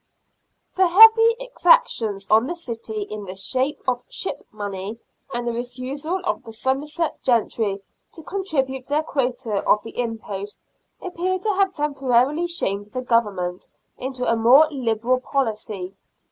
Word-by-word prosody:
The 375 -1 +4
heavy 450 +5 +8
exactions 485 - +2
on 220 +4 +5
the 345 - -3
city 230 -9 -4
in 210 0 -7
the 185 0 -7
shape 260 +8 -1
of 250 -1 +1
ship - - -4
money, 205 0 -5 0.3
and 240 -1 -3
the 235 - 0
refusal 255 +8 -4
of 350 - -1
the 230 -3 -11
Somerset 285 +7 -2
gentry 220 -4 0 0.3
to 325 - -10
contribute 275 -9 -2
their 295 +2 +1
quota 250 -8 -1
of 210 - +4
the 225 - -8
impost, 210 -4 -5 0.4
appear 370 +1 -2
to 425 +4 -3
have 385 -1 +2
temporarily 280 +2 +1
shamed 205 - -2
the 255 +4 -5
Government 200 -7 0 0.3
into 255 -1 -4
a 230 - +2
more 250 +7 +6
liberal 245 -2 0
policy. 215 -8 -3
250 Hz, 140 wpm, -22 LUFS, 220-305 Hz, 0.4 s, heavy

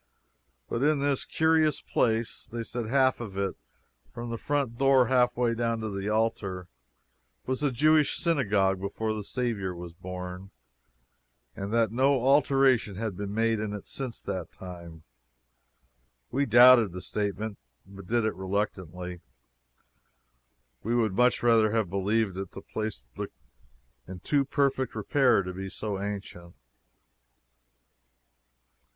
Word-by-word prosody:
But 115 - -2
it 150 +2 +3
is 140 -1 0
a - - -7
curious 160 -2 +2
place. 115 -1 -1
They 115 0 -4
said 120 0 -4
that - - -6
half 130 0 +3
of 105 -5 -7
it 100 -1 -1 0.6
from 120 0 -6
the 115 - -3
front 140 -5 -1
door 135 -2 +5
halfway 125 -2 +2
down 115 0 -1
to 110 -1 -3
the 100 +1 -3
altar 100 -5 -1 0.8
was 130 +2 -2
a 145 -2 +1
Jewish 155 +4 +3
synagogue 100 - +1
before 110 +3 -2
the 105 -1 -4
Saviour 100 -6 -2
was 85 -1 -8
born, 90 +1 -7 1.1
and 100 +1 -5
that 115 -2 +2
no 135 +3 +3
alteration 135 -6 +3
had 110 -1 -3
been 100 +1 -5
made 115 +1 +1
in 105 -1 -3
it 105 - -7
since 130 -4 -6
that 90 -3 -4
time. 85 -3 -10 1.3
We 140 +2 +1
doubted 120 -3 +7
the 90 - -6
statement, 105 +1 -3 0.3
but 95 -1 -12
did 115 +1 +1
it 110 - 0
reluctantly. 90 -3 -4 1.6
We 115 +3 -1
would 110 -5 +1
much 125 +4 +2
rather 110 -2 +4
have 110 -6 0
believed 100 0 0
it. 95 -1 -6
The - - -8
place 110 - -5
looked - - -6 0.7
in 95 0 -8
too 140 +6 +1
perfect 135 -3 0
repair 125 0 +3
to 90 0 -6
be 95 +1 -6
so 100 -1 -4
ancient. 100 -4 -6
110 Hz, 140 wpm, -28 LUFS, 95-125 Hz, 1.6 s, doubted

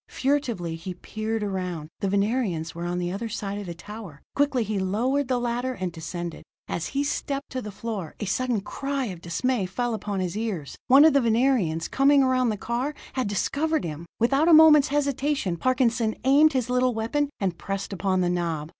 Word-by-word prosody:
Furtively 240 - -1
he 180 +2 -6
peered 215 +4 -3
around. 180 -6 -3
The 195 - -1
Venerians 200 -5 0
were 170 +1 -5
on 175 0 -2
the 175 0 -2
other 220 +4 -4
side 205 -2 -4
of 205 - -7
the 170 - -5
tower. 200 -5 -10
Quickly 280 -4 +2
he 210 -1 -2
lowered 240 +9 0
the 250 -1 +1
ladder 245 +2 -1
and 185 -6 -3
descended. 170 +1 -6 0.3
As 170 - -3
he 280 +1 -1
stepped 280 -1 -3
to 255 - -3
the 210 - -6
floor, 200 -5 -5
a 210 - -3
sudden 240 +2 0
cry 275 +5 -3
of 185 -6 -6
dismay 200 +5 -1
fell 240 +5 -2
upon 205 -2 -3
his 180 0 -2
ears. 210 -10 -3
One 275 +4 +8
of 320 - +6
the 280 - +4
Venerians, 225 -9 +2
coming 275 +1 +4
around 255 -2 +2
the 215 - -1
car, 245 +8 -2 0.2
had 255 -4 -1
discovered 300 +10 0
him. 160 +1 -6
Without 275 +7 +3
a 340 - +7
moment's 310 -2 +8
hesitation, 280 - 0
Parkinson 235 +1 +1
aimed 285 +4 +5
his 255 -3 0
little 250 -1 +1
weapon, 275 +6 0
and 185 -4 -2
pressed 195 0 -4
upon 185 0 0
the 175 - +1
knob. 165 -4 -2
225 Hz, 195 wpm, -25 LUFS, 185-260 Hz, 0.3 s, One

